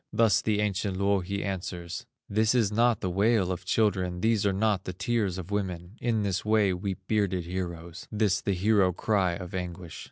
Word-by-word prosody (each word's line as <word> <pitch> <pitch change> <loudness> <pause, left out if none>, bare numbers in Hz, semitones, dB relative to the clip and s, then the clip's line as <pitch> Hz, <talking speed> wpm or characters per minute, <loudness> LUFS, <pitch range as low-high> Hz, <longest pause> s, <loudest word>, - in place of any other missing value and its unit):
Thus 110 0 +3
the 105 -1 +1
ancient 100 -2 -1
Louhi 100 0 0
answers: 90 -3 -5 0.2
"This 110 +3 +2
is 110 -5 +3
not 115 0 +2
the 95 - -1
wail 100 0 +2
of 90 0 -5
children, 95 -4 +1
These 110 -2 +2
are - - +3
not 100 0 +1
the 90 - -4
tears 100 -1 -1
of 95 +1 -7
women, 95 -2 -3
In 115 -3 +1
this 95 -2 -1
way 105 -3 +3
weep 95 +1 -3
bearded 95 -5 0
heroes; 85 -1 -5
This 105 -2 +1
the 100 - 0
hero 95 -1 +3
cry 95 -2 +1
of 90 -1 -7
anguish." 90 -2 -5
100 Hz, 185 wpm, -28 LUFS, 90-105 Hz, 0.2 s, Thus